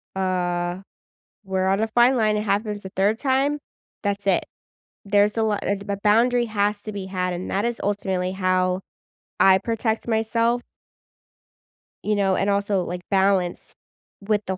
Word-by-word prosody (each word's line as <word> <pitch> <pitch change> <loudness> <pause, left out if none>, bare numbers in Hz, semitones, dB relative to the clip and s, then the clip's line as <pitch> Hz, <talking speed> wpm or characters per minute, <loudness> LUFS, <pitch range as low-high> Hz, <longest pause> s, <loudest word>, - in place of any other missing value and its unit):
uh, 180 -1 -1 0.7
we're 190 -1 -1
on 195 +2 +2
a 220 - 0
fine 240 +3 +4
line. 215 -2 +2
It 210 - 0
happens 205 0 -1
a 190 - -7
third 205 +4 +2
time, 275 +2 +1 0.4
that's 200 -1 -2
it. 190 -2 +2 0.6
There's 205 +1 +2
a 225 - +1
li 215 -2 +1 0.3
a 200 - -1
boundary 235 +3 +3
has 205 -1 0
to 215 - -6
be 200 -2 -5
had, 180 -1 -2
and 175 +1 -5
that 200 +2 0
is 235 -1 -2
ultimately 190 -2 -1
how 185 -1 +1 0.6
I 190 -1 +7
protect 225 0 -2
myself. 230 +2 +1 1.4
You 210 - +2
know, 195 -2 +2
and 200 +1 +1
also, 200 -2 +1
like, 175 +1 -5
balance 190 -2 +1 0.5
with 210 +1 0
the 190 0 -3
200 Hz, 155 wpm, -23 LUFS, 190-220 Hz, 1.4 s, I